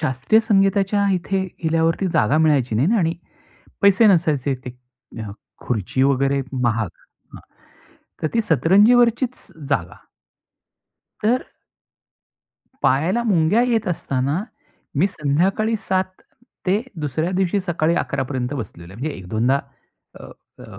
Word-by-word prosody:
शास्त्रीय 140 - +2
संगीताच्या 195 0 +2
इथे 190 +1 -1 0.2
गेल्यावरती 165 +3 +1
जागा 140 +9 +3
मिळायची 140 -7 +2
नाही 160 - +2
आणि 165 -2 +1 0.7
पैसे 200 +3 +5
नसायचे 155 -8 +2
ते - - -4 0.5
अ, 105 -2 -6 0.3
खुर्ची 120 +2 -1
वगैरे 140 0 +2 0.2
महाग 115 -4 0 0.5
हां. - - -12 0.8
तर - - +1
ती 230 - +3
सतरंजीवरचीच 235 - +4 0.3
जागा. 85 -11 -1 1.2
तर 240 +4 +1 1.4
पायाला 165 - +2
मुंग्या 200 -1 +2
येत 235 -5 0
असताना, 140 0 -1 0.6
मी 185 - +4
संध्याकाळी 190 +7 0
7 185 0 -1 0.5
ते 195 +4 +2 0.2
दुसऱ्या 155 +4 -2
दिवशी 190 +1 +1
सकाळी 170 -1 +1
11 140 -5 -1
पर्यंत 130 -1 -3
बसलेलो 95 -8 -8
आहे. 110 - -12
म्हणजे 150 +2 -3
एक 90 - -11
दोनदा 120 +7 +1 0.6
अ, - - -10 0.3
अ, - - -12
160 Hz, 120 wpm, -21 LUFS, 135-195 Hz, 1.4 s, पैसे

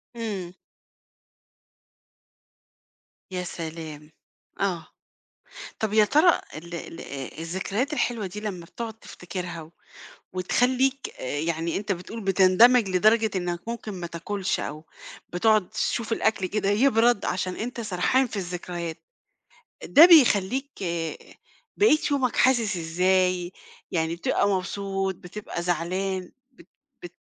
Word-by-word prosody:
إمم. 200 -6 -4 2.8
يا 180 -1 -3
سلام! 160 -3 -7 0.5
آه. 175 -5 -1 0.9
طَب 215 -1 -1
يا 215 -1 +6
ترى 310 - +4 0.2
ال 170 +2 -9
ال 165 0 -7 0.4
الذكريات 195 - -2
الحلوة 235 -8 -1
دي 210 +3 -7
لما 190 -5 -5
بتقعد 225 +4 -6
تفتكرها 180 -5 -7
و 155 - -15 0.6
وتخلّيك 255 +8 +1
آآ 145 +3 -3
يعني 165 +1 -1
أنت 205 0 -3
بتقول 195 +5 -5
بتندمج 195 +4 +5
لدرجة 215 +4 +3
إنك 175 +1 -3
ممكن 235 -2 -5
ما 175 -2 -5
تاكلش 190 +3 -3
أو 155 +2 -6 0.5
بتقعد 215 +1 +3
تشوف 230 -1 -2
الأكل 220 -3 +1
كده 200 +1 -1
يبرد، 230 0 +3
عشان 185 0 -2
أنت 235 +1 -4
سرحان 220 +6 +1
في 225 - -8
الذكريات، 175 -3 -4 0.9
ده 310 +4 +9
بيخلّيك 270 - +5 1.1
بقية 400 -7 +5
يومك 265 -4 +1
حاسس 235 -7 +3
إزاي؟ 180 +2 +1 0.4
يعني 165 -1 0
بتبقى 200 +3 +1
مبسوط، 195 0 -2
بتبقى 180 0 -7
زعلان، 180 +2 -2 0.2
بت 250 - -19 0.4
بت 175 0 -9
190 Hz, 110 wpm, -25 LUFS, 175-225 Hz, 2.8 s, ده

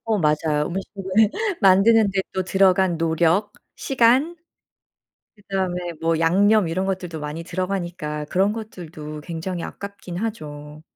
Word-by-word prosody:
어 220 -2 0
맞아요. 150 -1 +1
음식을 195 +2 -6 0.6
만드는데 195 +1 +5
또 190 - -1
들어간 190 -1 +3
노력, 165 +5 +1 0.2
시간, 270 +6 +2 1.0
그다음에 185 -4 -3
뭐 165 0 +1
양념 195 +4 +4
이런 185 +4 -1
것들도 180 -4 -3
많이 150 +3 -5
들어가니까 175 -4 -3
그런 195 +7 +1
것들도 160 -9 -8
굉장히 170 +2 -5
아깝긴 200 -3 -7
하죠. 150 -8 -6
180 Hz, 280 characters per minute, -22 LUFS, 165-200 Hz, 1.0 s, 만드는데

